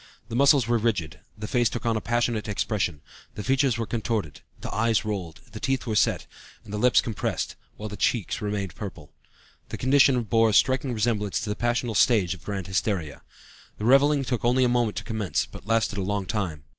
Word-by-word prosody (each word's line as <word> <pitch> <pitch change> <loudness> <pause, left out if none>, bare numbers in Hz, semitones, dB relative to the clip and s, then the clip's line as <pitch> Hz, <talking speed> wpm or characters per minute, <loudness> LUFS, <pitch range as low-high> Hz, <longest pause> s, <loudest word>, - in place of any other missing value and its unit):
The 115 - -4
muscles 140 -2 +5
were 120 -1 +2
rigid, 105 -9 -1 0.2
the 105 0 -5
face 120 0 +2
took 120 - -5
on 115 -1 +2
a 110 - -1
passionate 120 -2 0
expression; 100 -7 -1 0.3
the 105 - -5
features 135 0 +2
were 115 - -2
contorted, 110 - -3 0.2
the - - -6
eyes 110 0 +1
rolled, 95 -7 -4
the 110 - -8
teeth 135 +2 -1
were 110 -3 -2
set, - - +2 0.4
and 105 - -10
the 105 - -2
lips 125 +2 +5
compressed, 110 -3 -3 0.2
while 105 - -6
the 105 - -7
cheeks 115 0 -1
were 105 -1 -2
purple. 85 -6 -9 0.6
The - - -5
condition 130 -1 +4
bore 115 +1 +3
a - - -1
striking 130 +4 +3
resemblance 105 -3 0
to 105 - -3
the - - -2
passional 120 0 -1
stage 100 -5 +3
of 90 - -13
grand 100 -3 -4
hysteria. 95 -5 -2 0.6
The 105 - -4
reveling 140 +2 +4
took 125 -2 -2
only 125 +2 +3
a - - +4
moment 120 -3 +1
to - - -3
commence, 105 -8 -1
but - - -13
lasted 115 -2 +1
a - - -1
long 100 +1 -2
time. 90 -8 -3
110 Hz, 205 wpm, -25 LUFS, 100-120 Hz, 0.6 s, muscles